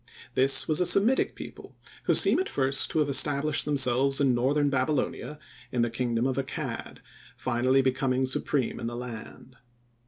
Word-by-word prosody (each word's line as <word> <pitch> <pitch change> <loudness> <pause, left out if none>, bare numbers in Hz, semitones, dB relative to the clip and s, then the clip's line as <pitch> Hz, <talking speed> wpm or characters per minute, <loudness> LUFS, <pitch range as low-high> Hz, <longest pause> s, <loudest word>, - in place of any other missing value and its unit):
This 135 +2 +3
was 155 +2 +1
a - - +3
Semitic 230 +7 +3
people - - -11 0.3
who - - +2
seem - - +5
at 375 - -2
first 135 0 0
to - - -4
have 150 -2 +2
established 145 +1 +2
themselves 135 -1 +1
in 135 -3 +2
northern 140 +4 0
Babylonia 140 +2 -2 0.3
in 120 -1 0
the 120 - -2
kingdom 120 0 -2
of 130 0 -2
Accad, 135 -1 -5 0.4
finally 130 +2 +1
becoming 130 0 0
supreme 130 0 -2
in 115 - -5
the 120 - -5
land. 125 +1 -10
135 Hz, 160 wpm, -26 LUFS, 125-145 Hz, 0.4 s, seem